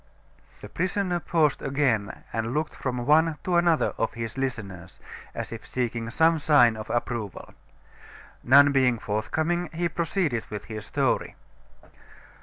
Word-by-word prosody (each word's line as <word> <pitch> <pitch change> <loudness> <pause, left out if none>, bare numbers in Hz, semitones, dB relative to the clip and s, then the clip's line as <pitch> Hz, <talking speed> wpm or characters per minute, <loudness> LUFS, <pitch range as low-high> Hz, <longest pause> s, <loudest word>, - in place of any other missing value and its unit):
The - - -8
prisoner 185 0 -1
paused 155 -4 +1
again 130 -7 -1
and 115 +2 -2
looked 155 +1 -1
from 125 -2 -3
one 155 +2 +4
to 180 - 0
another 170 -2 +2
of 115 - 0
his 115 -1 -5
listeners, 100 -10 -5 0.4
as - - -5
if - - -7
seeking 120 -2 -3
some 160 +6 +3
sign 135 -7 +5
of 110 0 -8
approval. 120 -4 -3 0.9
None 140 +3 +7
being 130 -3 +3
forthcoming, 160 +12 -2
he 170 +1 -1
proceeded 165 - -1
with 105 -1 -6
his 110 -2 -7
story. - - 0
135 Hz, 135 wpm, -26 LUFS, 115-160 Hz, 0.9 s, None